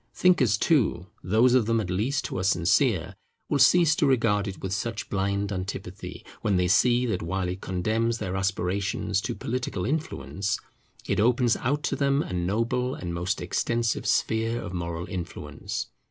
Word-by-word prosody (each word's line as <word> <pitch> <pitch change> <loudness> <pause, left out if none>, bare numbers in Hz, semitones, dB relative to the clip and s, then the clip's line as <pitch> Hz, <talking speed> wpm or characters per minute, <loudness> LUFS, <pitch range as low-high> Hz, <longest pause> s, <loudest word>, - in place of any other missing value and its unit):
Thinkers 130 - +4
too, 110 - +2 0.2
those 110 +7 +4
of 125 -4 +3
them 115 0 +2
at 95 -5 -3
least 120 +10 0
who - - -3
are - - -2
sincere, 90 -3 +2 0.4
will 145 - +1
cease 170 -2 +6
to 150 - +3
regard 115 -6 +2
it 95 - -6
with 95 0 -3
such 110 +3 -3
blind 100 +1 0
antipathy, 95 0 -6 0.2
when 100 -3 +1
they 90 0 +2
see 120 +6 +4
that 100 -7 -1
while 90 +2 -2
it 90 +1 -4
condemns 110 +5 0
their 95 -4 -3
aspirations 95 +1 -1
to 105 - -3
political 120 -7 -3
influence, 130 -9 -2 0.5
it - - 0
opens 120 +1 +3
out 145 +4 -1
to - - 0
them 140 0 +2
a - - -6
noble 115 +8 0
and 85 -1 -5
most 90 +4 -2
extensive 115 -2 -1
sphere 115 +1 +1
of 90 - -6
moral 85 -1 -3
influence. 90 -3 -5
105 Hz, 170 wpm, -26 LUFS, 95-120 Hz, 0.5 s, cease